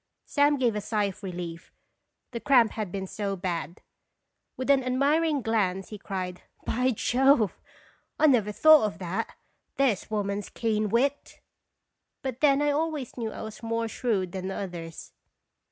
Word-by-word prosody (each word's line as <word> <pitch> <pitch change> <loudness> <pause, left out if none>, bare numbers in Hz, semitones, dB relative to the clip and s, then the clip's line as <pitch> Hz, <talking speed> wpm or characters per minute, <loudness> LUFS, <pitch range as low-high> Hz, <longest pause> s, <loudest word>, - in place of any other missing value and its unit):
Sam 290 0 +3
gave 240 -4 +1
a 210 - -2
sigh 210 0 0
of 200 -1 -3
relief, 175 -3 -6 0.6
the 235 - -4
cramp 240 -4 +4
had 215 -5 -4
been 195 0 -3
so 200 +1 -3
bad. 175 -3 -4 0.7
With 260 +2 +1
an 270 -2 +4
admiring 285 +3 +1
glance 195 -4 0
he 210 - -8
cried 185 -2 -5 0.2
"By 250 +3 +1
Jove! 255 -1 +2 0.6
I - - +4
never 235 -8 +4
thought 310 +3 +7
of 200 -1 -7
that. 185 0 -4 0.4
There 270 -6 +3
's - - -14
woman's 205 -2 -2
keen 215 -2 -1
wit! 270 +6 0 0.4
" - - -56
But 260 -1 -4
then 290 -1 +4
I 295 - +3
always 300 -3 -2
knew 225 -3 -3
I - - -7
was 220 -1 -8
more 230 0 -1
shrewd 210 -6 -1
than 190 0 -4
others. 175 -4 -6
220 Hz, 160 wpm, -27 LUFS, 195-265 Hz, 0.7 s, thought